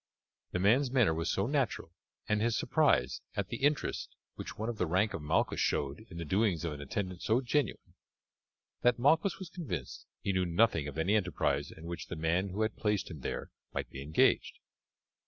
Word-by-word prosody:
The - - -1
man's 115 +9 +4
manner 125 -10 +4
was 80 +1 -1
so 95 - +1
natural, 130 - -1 0.4
and 105 0 +1
his 115 0 +2
surprise 60 0 +2
at - - -2
the - - -3
interest 145 +1 0 0.2
which - - -7
one 110 - -3
of 120 -2 -4
the 90 - +1
rank 95 +6 +2
of - - -4
Malchus 75 - +1
showed 70 +11 -1
in 85 - -9
the 85 - -4
doings 95 -1 +1
of 80 - -2
an 70 - -7
attendant 90 +5 -3
so 110 +3 +3
genuine, 135 -2 -1 0.9
that 125 -1 +4
Malchus 160 +9 +3
was 190 -3 -8
convinced 95 - -5
he 100 - -1
knew 95 0 +2
nothing 85 -4 +3
of 75 - -7
any 85 +6 +2
enterprise 80 -8 0
in 80 - -11
which 85 0 -5
the - - -5
man 85 +5 +1
who 100 +4 -1
had 110 - -2
placed 105 -3 0
him 80 - -7
there - - -4 0.2
might - - -3
be 65 - -7
engaged. 80 - +2
95 Hz, 195 wpm, -32 LUFS, 80-115 Hz, 0.9 s, man's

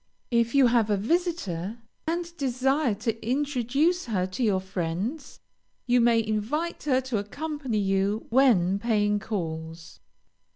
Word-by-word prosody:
If 235 +1 +2
you 275 -2 +6
have 230 -3 +3
a 205 - +2
visitor, 225 - -1 0.3
and 340 +1 -2
desire 265 -2 +1
to 225 +1 -3
introduce 280 +6 +1
her 200 -7 0
to 185 +6 -6
your 200 -4 +2
friends, 190 - -4 0.5
you 245 0 +3
may 230 -1 +3
invite 225 +11 -2
her 260 -3 +3
to 255 -4 -2
accompany 280 +3 -4
you 195 +2 0
when 205 -8 +4
paying 210 -2 +1
calls. 165 -5 -5
230 Hz, 130 wpm, -26 LUFS, 200-275 Hz, 0.5 s, you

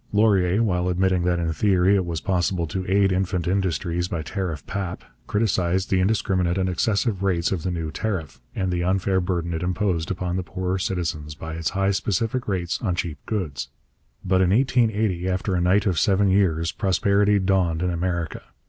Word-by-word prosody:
Laurier, 105 -1 +3
while 90 -4 0
admitting 90 0 +1
that 90 -1 +2
in 85 -1 -1
theory 95 +2 +3
it 95 -3 0
was 85 -2 -3
possible 90 -2 0
to 95 +4 -4
aid 100 0 +4
infant 90 -2 -1
industries 90 -2 0
by 85 -3 -3
tariff 85 - -4
pap, 95 -3 -4 0.2
criticized 95 -3 0
the 95 - +3
indiscriminate 95 -3 +1
and 95 -1 +1
excessive 100 +2 0
rates 90 -4 +1
of 95 -4 -1
the 90 - -2
new 80 -3 -3
tariff, 90 -8 -4
and 95 -2 -1
the 85 -1 -1
unfair 95 +1 +1
burden 85 -2 -2
it 80 - -3
imposed 90 -2 -1
upon 90 -1 -2
the - - 0
poorer 95 +1 -3
citizens 80 -5 -3
by 80 0 -7
its 80 0 -2
high 100 0 +2
specific 110 +5 -1
rates 90 -3 -2
on 95 -6 0
cheap 80 -5 -3
goods. 85 -11 -3 0.6
But 95 0 +3
in 90 - +3
1880, 110 -6 +2
after 95 +1 -1
a 90 - +1
night 95 +3 +3
of 90 -6 +1
seven 100 0 +3
years, 85 -4 +2
prosperity 100 +2 +2
dawned 90 -4 +1
in 90 - +1
America. 85 -2 -2
95 Hz, 185 wpm, -24 LUFS, 85-100 Hz, 0.6 s, aid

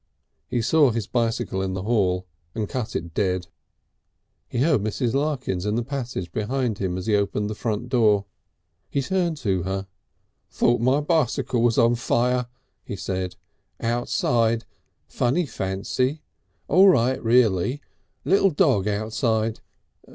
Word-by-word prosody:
He 120 -2 -1
saw 150 +3 +4
his 115 -3 -2
bicycle 115 -5 -1
in 95 -1 -2
the 95 - -4
hall 95 -5 +1 0.3
and 110 -2 -2
cut 125 -1 -4
it 85 -1 -4
dead. 90 -2 0 1.0
He - - -5
heard 135 -3 +3
Mrs. 110 +3 -1
Larkins 135 -10 -1
in 105 +1 -1
the 120 - 0
passage 125 - -4
behind 115 +2 -1
him 95 -2 -2
as 95 - -5
he 110 - +2
opened 105 +1 0
the - - -2
front 110 +1 -3
door. 105 -5 +3 0.6
He 140 - -1
turned 175 0 0
to 95 -9 0
her. 95 +1 -3 0.6
"Thought 120 -1 +2
my 130 +4 +3
bicycle 140 -6 +1
was 120 -1 +2
on 115 +1 +5
fire," 125 +1 +1 0.4
he - - -6
said. 95 -1 -3 0.4
"Outside. 115 -1 +1 0.4
Funny 135 +9 0
fancy! 125 +7 -2 0.4
All 185 +6 +6
right, 130 -5 +2
reely. 115 +1 +3 0.5
Little 195 0 +4
dog 140 - +2
outside.... 110 +1 0
115 Hz, 140 wpm, -24 LUFS, 100-130 Hz, 1.0 s, All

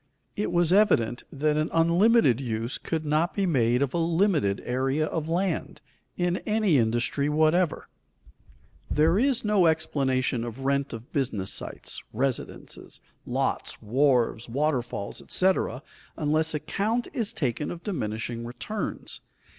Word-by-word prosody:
It 210 - -1
was 175 0 +3
evident 120 - +3
that 150 +2 0
an 155 +1 0
unlimited 170 - +4
use 115 -1 -3
could 160 -2 -3
not 155 +4 +1
be 200 - +1
made 125 -6 +2
of 135 - -2
a 170 - 0
limited 165 - +2
area 135 +5 0
of 160 0 -3
land, 175 0 -1 0.4
in 175 0 +1
any 210 -9 +2
industry 120 +5 +1
whatever. 155 +2 +2 1.0
There 160 +6 +3
is 260 -2 +1
no 205 -5 +4
explanation 135 -6 0
of 120 +3 -6
rent 140 0 +1
of 115 +1 -9
business 110 -9 -1
sites, - - -4
residences, 130 +3 -3 0.3
lots, - - -1
wharves, 120 -1 +1
waterfalls, 125 -6 -2
etc., 185 -7 +1 0.3
unless 155 +1 +1
account 200 +10 -1
is 225 -5 -1
taken 135 +1 -2
of 170 - -7
diminishing 115 - -3
returns. 165 - -4
150 Hz, 130 wpm, -26 LUFS, 125-175 Hz, 1.0 s, unlimited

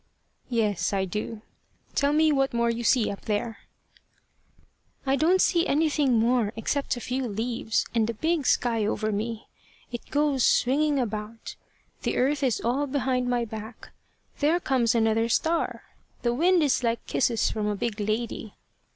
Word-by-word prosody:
"Yes, 215 -6 0
I 190 -1 +1
do. 210 +3 -5 0.5
Tell 280 0 +2
me 310 +1 +4
what 270 -3 +1
more 235 0 +2
you 235 +1 -4
see 235 -2 +3
up 200 - -9
there." 220 +2 -2 1.5
"I 270 0 +2
don't 335 +7 +3
see 345 -2 +3
anything 295 -3 +2
more, 230 -1 +2
except 265 +4 -1
a - - -4
few 250 +1 -2
leaves, 225 +1 -1
and 225 -2 +2
the 230 - -3
big 315 +3 0
sky 230 -3 +2
over 215 +1 -1
me. 220 +2 -3 0.5
It 240 - -7
goes 290 -3 +1
swinging 290 +3 +3
about. 220 -2 -4 0.5
The - - -1
earth 275 +3 +1
is 260 -5 +1
all 265 +5 0
behind 255 -2 0
my 240 -1 +1
back. 220 +1 -9 0.5
There 310 +4 +3
comes 250 -7 +1
another 225 0 +2
star! 325 +7 0 0.4
The 240 -1 +1
wind 345 +5 +3
is 280 -3 +2
like 235 -1 -1
kisses 235 -4 +1
from 215 -1 -2
a 210 - 0
big 215 +1 -3
lady. 215 0 -3
240 Hz, 160 wpm, -26 LUFS, 220-280 Hz, 1.5 s, me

